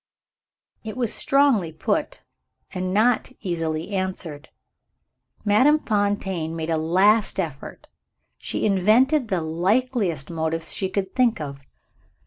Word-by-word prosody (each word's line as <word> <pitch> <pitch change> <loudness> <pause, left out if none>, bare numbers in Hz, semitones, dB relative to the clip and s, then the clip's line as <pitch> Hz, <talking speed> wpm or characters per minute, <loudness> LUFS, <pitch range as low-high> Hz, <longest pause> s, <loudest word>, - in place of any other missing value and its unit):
It 220 +2 -7
was 240 -4 +1
strongly 270 - +2
put, 155 - -2 0.5
and 185 -1 -3
not 220 +5 +2
easily 165 -2 -3
answered. 185 -6 -4 1.0
Madame 255 +9 +5
Fontaine 200 - -1
made 165 0 -3
a 160 - +1
last 195 +7 +2
effort 155 -7 -6 0.5
she - - -3
invented 225 - +3
the 190 -5 -1
likeliest 180 - 0
motives 160 0 -2
she 190 - -1
could 190 0 -3
think 245 -3 +2
of. 140 -2 -6
190 Hz, 110 wpm, -23 LUFS, 165-220 Hz, 1.0 s, Madame